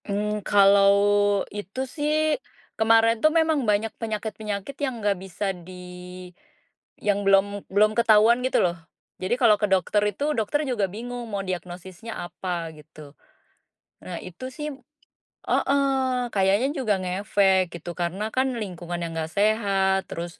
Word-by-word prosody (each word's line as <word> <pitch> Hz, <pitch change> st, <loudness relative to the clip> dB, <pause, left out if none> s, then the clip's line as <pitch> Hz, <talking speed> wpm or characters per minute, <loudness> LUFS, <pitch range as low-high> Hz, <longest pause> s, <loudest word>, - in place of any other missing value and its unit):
Mmm, 210 Hz, +1 st, -2 dB
kalau 200 Hz, 0 st, +6 dB, 0.6 s
itu 205 Hz, +3 st, -7 dB
sih, 295 Hz, +3 st, -2 dB, 0.6 s
kemarin 225 Hz, 0 st, +3 dB
tuh 310 Hz, -, +6 dB
memang 320 Hz, -1 st, +2 dB
banyak 210 Hz, +1 st, +1 dB
penyakit-penyakit 215 Hz, +1 st, -4 dB
yang 260 Hz, -4 st, -1 dB
nggak 205 Hz, -2 st, +1 dB
bisa 195 Hz, +1 st, -3 dB
di 180 Hz, 0 st, -11 dB, 1.2 s
yang 205 Hz, -1 st, 0 dB
belum 195 Hz, +1 st, +2 dB
belum 210 Hz, +2 st, +3 dB
ketahuan 230 Hz, +1 st, +5 dB
gitu 260 Hz, -, +2 dB
loh. 175 Hz, 0 st, -1 dB, 0.4 s
Jadi 185 Hz, +6 st, 0 dB
kalau 225 Hz, -4 st, +6 dB
ke 210 Hz, -, +3 dB
dokter 195 Hz, +2 st, +2 dB
itu, 285 Hz, +9 st, -2 dB
dokter 290 Hz, +8 st, 0 dB
juga 240 Hz, -7 st, 0 dB
bingung 240 Hz, +3 st, -6 dB
mau 200 Hz, -2 st, -2 dB
diagnosisnya 185 Hz, +4 st, -6 dB
apa, 175 Hz, -2 st, -5 dB
gitu. 150 Hz, -1 st, -14 dB, 0.9 s
Nah 180 Hz, -2 st, -5 dB
itu 185 Hz, +8 st, -8 dB
sih 300 Hz, +1 st, -4 dB, 0.8 s
heeh, 265 Hz, -3 st, +1 dB
kayaknya 195 Hz, +5 st, +3 dB
juga 235 Hz, -8 st, +1 dB
ngefek, 190 Hz, 0 st, +2 dB
gitu, 170 Hz, +1 st, -7 dB
karena 185 Hz, +5 st, -2 dB
kan 260 Hz, 0 st, +1 dB
lingkungan 175 Hz, -4 st, -5 dB
yang 165 Hz, -, -4 dB
nggak 160 Hz, 0 st, -4 dB
sehat, 200 Hz, -2 st, +2 dB
terus 170 Hz, +1 st, -6 dB
205 Hz, 135 wpm, -25 LUFS, 185-230 Hz, 1.2 s, kalau